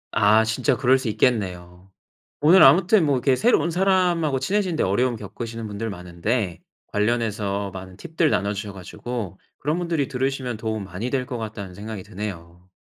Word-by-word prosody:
아 110 +2 +5
진짜 120 +4 +1
그럴 130 +1 +4
수 130 - -4
있겠네요. 90 -6 -1 0.5
오늘 170 +5 +7
아무튼 180 +7 +6
뭐 145 -2 +2
이렇게 130 +1 +2
새로운 195 - +2
사람하고 175 -5 +2
친해지는 190 +1 0
데 - - +1
어려움 120 +6 +1
겪으시는 115 +2 -7
분들 105 +2 -4
많은데 90 +2 -3 0.3
관련해서 105 -2 -1
많은 95 -1 -9
팁들 165 -1 0
나눠 100 -6 0
주셔 100 0 -6
가지고 100 +1 -6 0.2
그런 150 +5 -1
분들이 165 -5 -1
들으시면 130 -2 -2
도움 110 -1 -3
많이 95 +6 -5
될 130 -1 -1
것 125 -1 -5
같다는 105 -4 -6
생각이 105 0 -7
드네요. 90 -3 -8
115 Hz, 385 characters per minute, -23 LUFS, 100-135 Hz, 0.5 s, 오늘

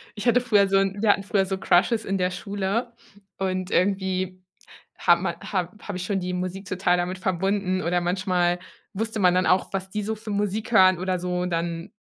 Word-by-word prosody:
ich 210 +3 -4
hatte 245 +1 +4
früher 210 -5 +3
so 195 0 +3
wir 195 +2 0
hatten 200 - +3
früher 200 -1 +1
so 190 0 -2
Crushes 195 +5 +2
in 195 - -1
der 180 0 0
Schule 200 +5 -3 0.4
und 185 -1 -2
irgendwie, 185 -1 0 0.5
hat 170 0 +4
man 175 -1 -2
hab 185 +2 -3
habe 200 -3 -4
ich 180 - -4
schon 195 0 -1
die 180 0 -3
Musik 185 +2 -4
total 185 -1 +1
damit 180 +1 -2
verbunden 190 +1 0
oder 175 +1 0
manchmal 180 -1 0 0.3
wusste 220 +2 -3
man 180 -2 +4
dann 185 +1 +2
auch, 185 - +2
was 190 0 -3
die 210 +2 -3
so 220 +2 -2
für 215 0 -8
Musik 205 +2 -2
hören 185 -5 +6
oder 185 0 -1
so. 180 0 -2
Dann 170 -1 -3
190 Hz, 200 wpm, -24 LUFS, 180-200 Hz, 0.5 s, hören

